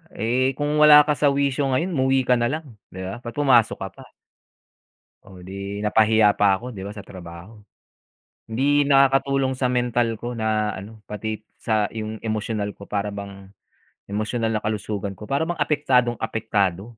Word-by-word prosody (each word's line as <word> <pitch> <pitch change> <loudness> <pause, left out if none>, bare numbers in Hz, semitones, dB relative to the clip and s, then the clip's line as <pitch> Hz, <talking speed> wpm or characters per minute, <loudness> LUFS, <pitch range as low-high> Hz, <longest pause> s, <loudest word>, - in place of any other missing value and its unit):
eh, 130 +4 0
kung 145 0 -1
wala 150 -1 +9
ka 150 - +2
sa 145 - +3
wisyo 140 0 0
ngayon 165 +8 0
umuwi 130 -1 +2
ka 125 - +4
nalang 150 +7 -1 0.2
'di 95 - -9
ba, 95 +5 -5
ba't 120 -1 -8
pumasok 130 -6 +4
ka - - -5
pa? - - -15 1.1
Oh, 95 - -15
'di 100 +2 -6
napahiya 110 0 +4
pa 100 -1 +3
ako 125 +6 -7
'di 100 - -9
ba 105 - -8
sa 100 - -8
trabaho. 90 +4 -11 0.9
Hindi 140 +6 +2
nakakatulong 135 -1 +3
sa 125 -1 0
mental 120 -2 0
ko 120 0 -5
na 110 -2 0
ano, 105 +3 -10
pati 110 +1 -4 0.2
sa 110 -2 0
yung 110 -1 -6
emosyonal 110 -2 -3
ko 100 - -11
para 100 0 -2
bang, 100 -1 -8 0.6
emosyonal 110 +3 -2
na 110 - -1
kalusugan 105 -2 -3
ko 105 - -10
para 140 +7 -1
bang 175 - -2
apektadong 135 -5 +1
apektado. 100 -4 -1
110 Hz, 165 wpm, -23 LUFS, 105-135 Hz, 1.1 s, wala